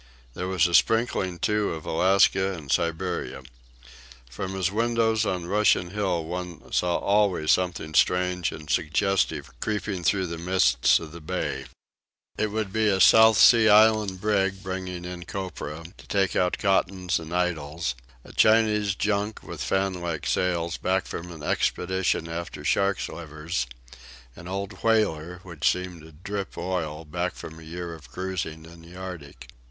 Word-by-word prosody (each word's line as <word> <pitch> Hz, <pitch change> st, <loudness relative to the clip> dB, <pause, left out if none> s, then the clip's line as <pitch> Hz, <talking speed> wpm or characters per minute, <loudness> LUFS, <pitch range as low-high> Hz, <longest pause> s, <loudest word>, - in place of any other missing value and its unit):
There 90 Hz, -, -4 dB
was 95 Hz, -3 st, +2 dB
a 85 Hz, -, 0 dB
sprinkling, 95 Hz, -1 st, +2 dB
too, 105 Hz, +1 st, 0 dB
of 80 Hz, -, -9 dB
Alaska 95 Hz, +2 st, +3 dB
and 75 Hz, -5 st, -7 dB
Siberia. 85 Hz, +4 st, -1 dB, 0.9 s
From 95 Hz, +9 st, -5 dB
his 95 Hz, -1 st, 0 dB
windows 110 Hz, 0 st, +1 dB
on 90 Hz, -2 st, -2 dB
Russian 95 Hz, -2 st, +2 dB
Hill 95 Hz, -5 st, -1 dB
one 90 Hz, -1 st, -6 dB
saw 90 Hz, -1 st, +1 dB
always 100 Hz, -6 st, +2 dB
something 90 Hz, -4 st, 0 dB
strange 90 Hz, +1 st, +2 dB
and 75 Hz, -1 st, -9 dB
suggestive 80 Hz, -2 st, 0 dB
creeping 105 Hz, -, -3 dB
through 95 Hz, +2 st, +2 dB
the 85 Hz, -1 st, -5 dB
mists 85 Hz, -9 st, +3 dB
of 80 Hz, -2 st, -9 dB
the 85 Hz, 0 st, -10 dB
bay. 75 Hz, -5 st, -3 dB, 0.7 s
It 110 Hz, -, 0 dB
would 105 Hz, -2 st, -3 dB
be 110 Hz, 0 st, +2 dB
a 95 Hz, -2 st, +2 dB
South 110 Hz, +2 st, +7 dB
Sea 115 Hz, -2 st, +7 dB
Island 105 Hz, -2 st, +5 dB
brig, 95 Hz, -2 st, 0 dB
bringing 95 Hz, -1 st, -5 dB
in 90 Hz, -1 st, -7 dB
copra, 85 Hz, -5 st, -6 dB
to -, -, -16 dB
take 95 Hz, -2 st, +1 dB
out 90 Hz, -1 st, +1 dB
cottons 95 Hz, -3 st, +1 dB
and 80 Hz, 0 st, -9 dB
idols; 85 Hz, -4 st, -1 dB, 0.3 s
a -, -, -14 dB
Chinese 105 Hz, -2 st, +3 dB
junk 105 Hz, +1 st, -1 dB
with -, -, -8 dB
fan 95 Hz, 0 st, 0 dB
like 85 Hz, -3 st, -4 dB
sails, 85 Hz, -2 st, 0 dB
back 95 Hz, 0 st, 0 dB
from 85 Hz, +1 st, -7 dB
an 80 Hz, -3 st, -10 dB
expedition 90 Hz, +1 st, 0 dB
after 85 Hz, +1 st, -6 dB
sharks' 100 Hz, 0 st, +1 dB
livers; 75 Hz, -5 st, -4 dB, 0.7 s
an 85 Hz, -, -11 dB
old 95 Hz, +1 st, -5 dB
whaler, 90 Hz, -7 st, +1 dB
which 85 Hz, -4 st, +1 dB
seemed 90 Hz, -2 st, -5 dB
to 80 Hz, +1 st, -14 dB
drip 95 Hz, +5 st, -6 dB
oil, 85 Hz, -3 st, -3 dB
back 90 Hz, +4 st, -3 dB
from 80 Hz, 0 st, -9 dB
a -, -, -12 dB
year 85 Hz, +1 st, -6 dB
of 75 Hz, -6 st, -13 dB
cruising 85 Hz, -3 st, -4 dB
in 85 Hz, 0 st, -14 dB
the 85 Hz, +2 st, -14 dB
Arctic. 90 Hz, -7 st, -9 dB
90 Hz, 155 wpm, -26 LUFS, 85-100 Hz, 0.9 s, South